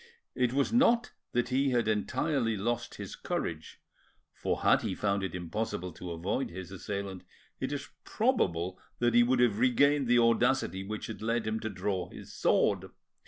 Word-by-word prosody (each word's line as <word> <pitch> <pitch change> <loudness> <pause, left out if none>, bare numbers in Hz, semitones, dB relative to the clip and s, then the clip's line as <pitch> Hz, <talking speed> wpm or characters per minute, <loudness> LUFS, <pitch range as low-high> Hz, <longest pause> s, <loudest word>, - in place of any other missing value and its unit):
It 125 -2 +1
was 140 - +1
not 240 -1 +4 0.2
that 120 0 0
he 135 +2 +2
had 120 -3 +1
entirely 115 +2 0
lost 120 +4 -2
his - - -7
courage, 80 -1 -4 0.5
for - - -2
had - - +5
he 95 - -2
found 100 -1 0
it 95 -1 -3
impossible 90 0 -3
to 90 +2 -8
avoid 85 +10 -2
his 95 +1 -8
assailant 100 -1 -5 0.4
it 130 +1 -2
is 145 0 -4 0.2
probable 95 - 0 0.2
that 120 -1 +2
he 120 - +7
would 125 +1 +3
have 115 -4 +3
regained 135 +3 +4
the 120 0 +5
audacity 115 -5 +2
which 105 +2 -5
had 110 - -7
led 115 +1 0
him 110 0 -1
to 110 - -3
draw 95 -2 -2
his - - -11
sword. - - +2
115 Hz, 170 wpm, -30 LUFS, 95-125 Hz, 0.5 s, he